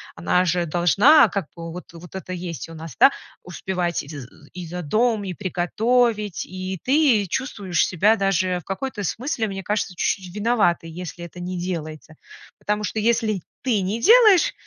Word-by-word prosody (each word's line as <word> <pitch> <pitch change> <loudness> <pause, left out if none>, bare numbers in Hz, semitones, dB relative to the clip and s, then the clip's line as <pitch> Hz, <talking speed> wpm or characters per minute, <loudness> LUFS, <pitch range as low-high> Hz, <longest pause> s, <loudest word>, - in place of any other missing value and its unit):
она 90 - +1
же 175 0 +1
должна, 200 - +5
как 195 -1 -2
бы, 165 0 -7
вот 175 0 -10
вот 170 +2 -12
это 185 -1 -6
есть 170 -2 -6
у 165 - -10
нас, 160 -4 -9
да, 275 - +8 0.3
успевать 180 -1 -3
и - - -14
з 145 -5 -8 0.3
и 180 -1 -7
за 175 +2 -6
дом, 215 +6 +1
и 185 - -4
приготовить, 210 +3 0
и 185 0 -5
ты 260 -7 +3
чувствуешь 200 - -1
себя 200 +5 +3
даже 185 -3 0
в - - -15
какой-то 210 +2 -4
смысле, 230 - -2
мне 195 -1 -5
кажется, 205 -1 -2
чуть-чуть 185 0 -2
виноватой, 210 -7 +1
если 175 +1 -8
это 170 +1 -11
не 180 0 -4
делается. 155 -3 -6 0.4
Потому 210 0 -2
что 210 - -4
если 220 -3 +1 0.2
ты 230 -7 +1
не 205 +5 -2
делаешь, 430 - +6
185 Hz, 170 wpm, -22 LUFS, 175-220 Hz, 0.4 s, да